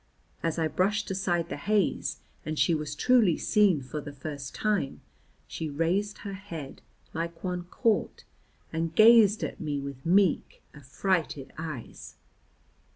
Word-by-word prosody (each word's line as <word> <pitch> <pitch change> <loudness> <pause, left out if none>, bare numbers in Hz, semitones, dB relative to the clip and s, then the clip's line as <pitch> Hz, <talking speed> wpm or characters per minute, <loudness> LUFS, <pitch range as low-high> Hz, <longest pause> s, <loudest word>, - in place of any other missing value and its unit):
As 165 -1 -1
I 160 -1 +1
brushed 195 +6 0
aside 175 -3 0
the - - -4
haze 210 -3 0 0.2
and 155 0 -4
she 170 - +3
was 150 -1 -2
truly 220 -1 +4
seen 195 -9 +3
for 150 +4 -5
the 145 - -8
first 140 0 -7
time, 205 -10 -1 0.4
she 160 - -5
raised 175 +8 0
her 200 - -4
head, 170 -8 -8 0.3
like 165 +1 -4
one 180 -1 -3
caught, 225 +4 0 0.5
and 165 0 -2
gazed 220 -1 +7
at - - -4
me 145 -3 -2
with 140 -1 -7
meek 185 +1 +2
affrighted 150 +1 -2
eyes. 155 -6 -7
165 Hz, 140 wpm, -28 LUFS, 150-200 Hz, 0.5 s, gazed